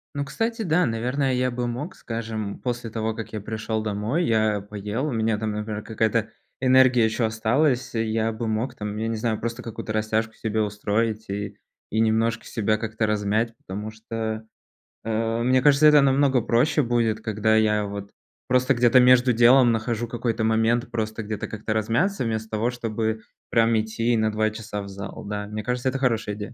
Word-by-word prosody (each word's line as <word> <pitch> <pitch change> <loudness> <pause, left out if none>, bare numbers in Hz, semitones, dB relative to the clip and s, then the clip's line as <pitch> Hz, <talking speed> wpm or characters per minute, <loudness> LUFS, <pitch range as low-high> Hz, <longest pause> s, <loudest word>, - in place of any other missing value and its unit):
Ну 140 0 -2
кстати, 225 - -2
да, 180 -1 +2
наверное, 125 +4 0
я 125 0 +1
бы 120 0 -2
мог 135 +9 -5
скажем 110 -3 -5
после 120 -2 -3
того 110 0 -2
как 115 0 -7
я 110 - -4
пришёл 110 +1 -3
домой, 110 - -1
я 110 -2 +2
поел 105 +5 -4
у - - -2
меня 110 -2 0
там 110 0 -2
например 105 0 -4
какая-то 110 0 0 0.3
энергия 130 -2 +5
ещё 110 +1 0
осталась, 120 +5 +1
я 110 0 0
бы 110 +1 -4
мог, 110 +4 -1
там 105 -2 -5
я 110 +1 -2
не 115 - -1
знаю, 110 -1 -1
просто 115 +1 -4
какую-то 110 -2 -6
растяжку 110 +1 0
себе 110 0 -2
устроить 105 +1 -1
и, 100 +1 -4 0.3
и 110 - 0
немножко 115 +1 +1
себя 110 -1 0
как-то 110 0 -2
размять. 105 +2 0
Потому 105 +3 -6
что, 110 0 -5 0.6
э 115 +1 -1
мне 130 +1 +3
кажется, 145 +2 +6
это 150 -1 +7
намного 135 -1 +3
проще 145 +8 +2
будет, 115 -2 0
когда 110 0 +1
я 105 -1 +2
вот 100 0 -7 0.4
просто 130 +1 +3
где-то 120 +1 +5
между 125 0 +6
делом 120 +2 +6
нахожу 115 +1 -1
какой-то 115 -1 -2
момент, 115 +3 +1
просто 110 -1 -3
где-то 105 0 -4
как-то 110 0 -5
размяться, 115 - 0
вместо 110 -1 -3
того, 110 +2 0
чтобы 110 -2 -2 0.3
прям 115 -1 +3
идти 110 +2 0
на 110 0 +2
2 110 0 +1
часа 110 -1 -6
в 100 - -8
зал. 100 +1 -8
Да, 105 0 -4
мне 105 +1 -5
кажется, 125 +3 -2
это 135 +1 -3
хорошая 115 -5 0
идея. 105 +2 -7
110 Hz, 185 wpm, -24 LUFS, 110-120 Hz, 0.6 s, это